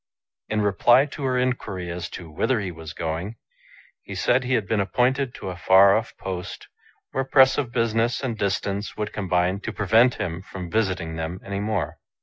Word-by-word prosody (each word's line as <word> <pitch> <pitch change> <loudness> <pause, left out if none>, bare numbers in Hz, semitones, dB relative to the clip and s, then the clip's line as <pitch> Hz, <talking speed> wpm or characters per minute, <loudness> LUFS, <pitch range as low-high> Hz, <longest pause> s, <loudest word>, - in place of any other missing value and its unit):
In 110 0 0
reply 120 +6 +4
to 145 0 -8
her 130 -1 +1
inquiry 105 -8 -2
as 85 0 -5
to 85 - -8
whither 120 +10 +1
he 95 -3 -3
was 80 -2 -9
going, 85 +7 -4 0.7
he - - -8
said 130 +2 +2
he 125 +1 +1
had 105 -5 -1
been 110 0 +1
appointed 125 +7 +1
to 95 - -5
n - - -7
far 95 +2 +6
off 115 +1 -3
post, 90 -2 -6 0.4
where 135 - -1
press 130 -1 +5
of 125 -5 -2
business 115 0 +1
and 120 -4 -1
distance 100 0 -2
would 105 0 -3
combine 90 -1 0
to - - -5
prevent 110 +5 +3
him 85 0 -4
from 90 -2 -8
visiting 95 -7 -1
them 80 +3 -4
any 100 0 -3
more. 105 -6 -2
100 Hz, 185 wpm, -24 LUFS, 90-120 Hz, 0.7 s, far